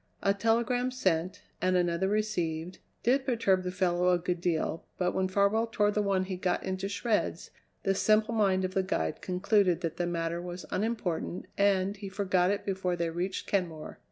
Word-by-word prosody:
A 200 - +4
telegram 235 +4 +1
sent, 185 -8 -1 0.2
and 185 0 +3
another 175 +1 +1
received, 180 -5 -1 0.2
did 260 +3 +3
perturb 225 -8 +2
the 180 - -3
fellow 180 -1 +1
a 180 - +4
good 175 0 -2
deal, 165 -2 -1
but 180 -1 +1
when 190 0 +1
Farwell 200 +4 +2
tore 210 -2 +2
the 210 - +1
one 195 -2 +1
he 185 -1 -4
got 180 -1 0
into 190 +1 -3
shreds, 215 +1 -1 0.3
the 195 - +2
simple 215 +3 +3
mind 195 -4 +2
of 185 - -4
the 190 - +2
guide 80 - -2
concluded 185 -1 +2
that 165 -3 -3
the 175 - 0
matter 170 0 -2
was 175 0 -7
unimportant, 190 -5 -2
and 200 0 +2
he 200 -1 -6
forgot 185 -2 +1
it 200 0 -1
before 190 -2 -1
they 170 -1 -1
reached 180 +3 -3
Kenmore. 170 -6 -2
185 Hz, 185 wpm, -30 LUFS, 180-205 Hz, 0.3 s, A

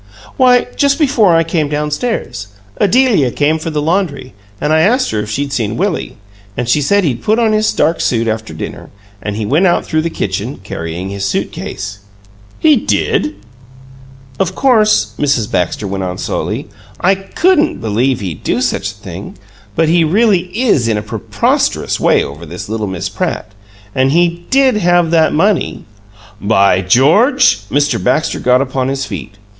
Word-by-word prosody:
"Why, 250 -1 +4
just 280 -1 +2
before 255 - +3
I 165 - +4
came 160 -3 -1
down 150 0 -2
stairs, 130 - -3 0.3
Adelia 210 - +3
came 150 +5 0
for 165 - -4
the 150 -2 -2
laundry; 160 -6 -1 0.3
and 150 - 0
I 160 - +4
asked 245 +9 +2
her 110 - -1
if 105 - -4
she'd 140 +5 -3
seen 110 -2 -2
Willie; 190 - -2 0.4
and 125 -1 -2
she 145 +5 +2
said 200 +8 +2
he'd 125 -8 -1
put 215 +1 +1
on 225 -2 +2
his 215 0 +2
dark 165 - +1
suit 115 -1 0
after 110 -3 -3
dinner, 80 - -7 0.3
and 105 0 -4
he 110 0 -3
went 155 - +3
out 175 - +1
through 155 - 0
the 170 - -2
kitchen, - - -3
carrying 85 +3 -5
his 100 0 -4
suit 100 - -1
case." 100 +1 -6 0.6
"He 310 -2 +4
did?" 100 - 0 1.0
"Of 185 -1 -1
course," 220 -5 +3
Mrs. 135 -7 0
Baxter 90 +4 -1
went 95 0 -3
on, 90 -1 -4
slowly, - - -3 0.3
"I 190 +2 +3
COULDN'T 310 - +1
believe 115 +4 0
he'd 90 -6 -6
do - - 0
such 95 - -1
a 105 - -10
thing, 95 -2 -9 0.4
but 160 - +2
he 170 +1 +3
really 185 +1 +2
is 180 - +2
in 110 -2 +1
a 105 - -3
PREPOSTEROUS 110 -1 -1
way - - +3
over 75 +4 -8
this 85 +3 -7
little 110 0 -3
Miss 95 0 -4
Pratt, 105 +1 -4 0.4
and 130 +1 +2
he 170 +1 +1
DID 265 -4 +3
have 175 -3 +2
that 160 -2 +3
money 195 +5 0 0.3
" 105 0 -23 0.2
"By 95 -1 +4
George!" 215 - +3
Mr. 145 0 0
Baxter 135 +5 0
got 125 +1 +3
upon 130 -1 -2
his 135 0 -2
feet. 100 - -7
150 Hz, 175 wpm, -14 LUFS, -, 1.0 s, Why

